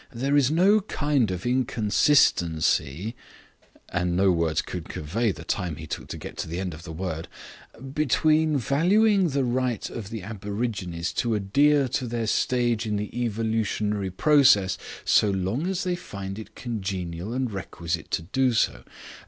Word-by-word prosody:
There 135 Hz, +4 st, 0 dB
is 140 Hz, -3 st, +4 dB
no 190 Hz, +7 st, +4 dB
kind 145 Hz, -, 0 dB
of 90 Hz, +2 st, -4 dB
inconsistency" 105 Hz, -, +2 dB, 0.8 s
and 90 Hz, -1 st, -1 dB
no 95 Hz, 0 st, +4 dB
words 85 Hz, -2 st, +1 dB
can 90 Hz, -, -5 dB
convey 100 Hz, +11 st, -1 dB
the -, -, -9 dB
time 85 Hz, -4 st, -2 dB
he 80 Hz, -, -8 dB
took -, -, -6 dB
to -, -, -6 dB
get -, -, -9 dB
to -, -, -3 dB
the 85 Hz, +2 st, -4 dB
end 95 Hz, -2 st, -3 dB
of 80 Hz, -, -10 dB
the 80 Hz, -, -9 dB
word 80 Hz, -1 st, -4 dB, 0.7 s
"between 155 Hz, +1 st, +2 dB
valuing 185 Hz, -, +3 dB
the 140 Hz, -1 st, 0 dB
right 125 Hz, -2 st, -1 dB
of 105 Hz, -4 st, -6 dB
the 110 Hz, -4 st, -6 dB
aborigines 100 Hz, -4 st, -3 dB
to 115 Hz, -2 st, +1 dB
adhere 140 Hz, +8 st, +3 dB
to 125 Hz, -, -2 dB
their 115 Hz, -1 st, -2 dB
stage 120 Hz, 0 st, +1 dB
in 105 Hz, -, -1 dB
the 105 Hz, +2 st, -4 dB
evolutionary 110 Hz, -3 st, -1 dB
process, 105 Hz, -3 st, +4 dB, 0.3 s
so 105 Hz, -, +4 dB
long 100 Hz, -, -1 dB
as 190 Hz, -1 st, -1 dB
they 180 Hz, -1 st, 0 dB
find 100 Hz, -, -7 dB
it 110 Hz, -, -11 dB
congenial 95 Hz, -5 st, -4 dB
and 130 Hz, -1 st, -1 dB
requisite 85 Hz, -4 st, -4 dB
to -, -, -1 dB
do 130 Hz, +8 st, +1 dB
so. 110 Hz, -, +1 dB
110 Hz, 160 wpm, -25 LUFS, 95-130 Hz, 0.8 s, is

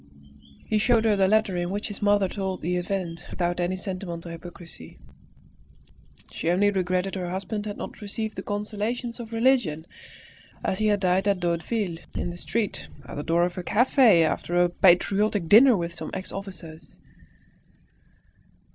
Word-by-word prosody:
He 215 Hz, -, +1 dB
showed 230 Hz, 0 st, +3 dB
her 215 Hz, -2 st, +4 dB
the 195 Hz, -1 st, +3 dB
letter 210 Hz, -2 st, +2 dB
in 175 Hz, 0 st, -1 dB
which 205 Hz, +2 st, -3 dB
his 205 Hz, -, -8 dB
mother 205 Hz, -1 st, +3 dB
told 190 Hz, -1 st, -4 dB
the 180 Hz, +3 st, -1 dB
event 175 Hz, -2 st, -3 dB
without 175 Hz, 0 st, -2 dB
any 175 Hz, +1 st, 0 dB
sentimental 185 Hz, -3 st, -5 dB
hypocrisy. 165 Hz, -, -10 dB, 1.3 s
She 165 Hz, -, -2 dB
only 200 Hz, +4 st, +3 dB
regretted 185 Hz, 0 st, -1 dB
her 180 Hz, -2 st, -3 dB
husband 205 Hz, +3 st, -4 dB
had 205 Hz, -, -5 dB
not -, -, -8 dB
received 215 Hz, +1 st, -4 dB
the -, -, -4 dB
consolations 215 Hz, +4 st, -3 dB
of 230 Hz, -1 st, -8 dB
religion, 225 Hz, -, +2 dB, 0.8 s
as 190 Hz, -, -1 dB
he 215 Hz, -, +2 dB
had 205 Hz, -2 st, +2 dB
died 185 Hz, +1 st, +2 dB
at 200 Hz, -2 st, +2 dB
Daudeville, 175 Hz, +1 st, -1 dB, 0.2 s
in 175 Hz, -, -2 dB
the 175 Hz, -, -9 dB
street, 215 Hz, +3 st, -3 dB, 0.2 s
at -, -, -8 dB
the 145 Hz, -, -3 dB
door 170 Hz, +3 st, +2 dB
of 180 Hz, +1 st, -2 dB
a -, -, -2 dB
cafe 230 Hz, -4 st, +5 dB
after 170 Hz, +2 st, -1 dB
a 175 Hz, -, +2 dB
patriotic 195 Hz, +2 st, +3 dB
dinner 235 Hz, +5 st, +7 dB
with 170 Hz, -1 st, -3 dB
some -, -, -6 dB
ex 190 Hz, 0 st, -4 dB
officers. 165 Hz, -5 st, -9 dB
190 Hz, 165 wpm, -25 LUFS, 175-210 Hz, 1.3 s, dinner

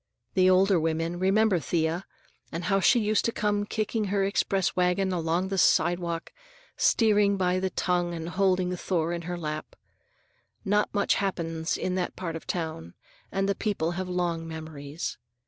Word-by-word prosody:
The 185 Hz, -1 st, +4 dB
older 185 Hz, 0 st, +4 dB
women 165 Hz, +2 st, -1 dB
remember 195 Hz, 0 st, +3 dB
Thea, 165 Hz, +2 st, -1 dB, 0.4 s
and 165 Hz, +2 st, -4 dB
how 195 Hz, +2 st, +2 dB
she 240 Hz, +5 st, +5 dB
used 215 Hz, -1 st, +1 dB
to 230 Hz, -, +1 dB
come 205 Hz, -1 st, 0 dB
kicking 215 Hz, 0 st, -1 dB
her 200 Hz, 0 st, +1 dB
express 195 Hz, -1 st, 0 dB
wagon 180 Hz, +1 st, +2 dB
along 170 Hz, +2 st, 0 dB
the 195 Hz, -1 st, 0 dB
sidewalk, 170 Hz, 0 st, +2 dB, 0.4 s
steering 205 Hz, -3 st, +3 dB
by 180 Hz, -1 st, +1 dB
the 190 Hz, 0 st, -1 dB
tongue 175 Hz, -2 st, 0 dB
and 165 Hz, 0 st, -5 dB
holding 185 Hz, -1 st, +1 dB
Thor 170 Hz, -2 st, -1 dB
in 170 Hz, -, -3 dB
her 175 Hz, -, -2 dB
lap. 155 Hz, -2 st, -5 dB, 0.9 s
Not 205 Hz, +1 st, +2 dB
much 205 Hz, -1 st, +2 dB
happens 165 Hz, -4 st, -2 dB
in 185 Hz, -, -2 dB
that 180 Hz, -, -4 dB
part 165 Hz, -3 st, -4 dB
of 165 Hz, -, -8 dB
town, 160 Hz, -, -4 dB, 0.4 s
and 195 Hz, 0 st, 0 dB
the 200 Hz, -, +2 dB
people 195 Hz, -6 st, -1 dB
have 185 Hz, +1 st, -4 dB
long 170 Hz, -2 st, -1 dB
memories. 155 Hz, -1 st, -6 dB
180 Hz, 165 wpm, -27 LUFS, 165-195 Hz, 0.9 s, she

